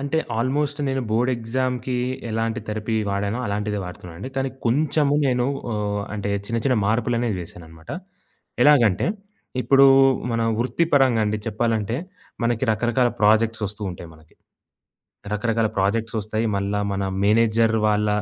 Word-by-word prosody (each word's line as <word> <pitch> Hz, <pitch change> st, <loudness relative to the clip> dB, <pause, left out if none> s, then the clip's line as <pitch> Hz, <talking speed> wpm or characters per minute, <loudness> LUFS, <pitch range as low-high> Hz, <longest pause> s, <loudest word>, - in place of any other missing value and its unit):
అంటే, 140 Hz, +3 st, -1 dB, 0.2 s
ఆల్మోస్ట్ 140 Hz, +4 st, 0 dB
నేను 135 Hz, 0 st, -1 dB
బోర్డ్ 120 Hz, +4 st, +2 dB
ఎగ్సామ్‌కి 125 Hz, +2 st, -2 dB, 0.3 s
ఎలాంటి 115 Hz, +2 st, -1 dB
థెరపీ 110 Hz, +1 st, -2 dB, 0.2 s
వాడానో, 100 Hz, +3 st, -1 dB
అలాంటిదే 105 Hz, +1 st, -2 dB
వాడుతున్నానండి. 90 Hz, +3 st, -8 dB
కానీ 135 Hz, 0 st, 0 dB, 0.2 s
కొంచెము 145 Hz, +3 st, +2 dB
నేను 125 Hz, -1 st, +1 dB, 0.3 s
ఆహ్, 105 Hz, -1 st, -2 dB
అంటే, 100 Hz, -1 st, -3 dB, 0.2 s
చిన్న, 115 Hz, +2 st, -1 dB
చిన్న 130 Hz, -2 st, +3 dB
మార్పులనేవి 115 Hz, -1 st, 0 dB
వేశానన్నమాట. 80 Hz, -1 st, -12 dB, 0.7 s
ఎలాగంటే, 120 Hz, -, +4 dB, 0.5 s
ఇప్పుడు 135 Hz, 0 st, +6 dB, 0.5 s
మన 115 Hz, 0 st, 0 dB, 0.2 s
వృత్తి 130 Hz, +7 st, +1 dB
పరంగా 130 Hz, -5 st, +4 dB
అండి 105 Hz, 0 st, -1 dB
చెప్పాలంటే, 115 Hz, 0 st, -1 dB, 0.5 s
మనకి 120 Hz, +1 st, +1 dB
రకరకాల 120 Hz, +3 st, +1 dB
ప్రొజెక్ట్స్ 110 Hz, +1 st, +3 dB
ఒస్తూంటాయి 95 Hz, -5 st, -7 dB
మనకి. 80 Hz, 0 st, -21 dB, 1.0 s
రకరకాల 110 Hz, +1 st, 0 dB
ప్రొజెక్ట్స్ 115 Hz, +4 st, 0 dB
ఒస్తాయి. 110 Hz, +2 st, -2 dB
మళ్ళా 100 Hz, +1 st, -1 dB
మన 100 Hz, -, -2 dB, 0.2 s
మేనేజర్ 115 Hz, +1 st, +3 dB
వాళ్ళ 105 Hz, 0 st, +1 dB
115 Hz, 125 wpm, -23 LUFS, 105-125 Hz, 1.0 s, ఇప్పుడు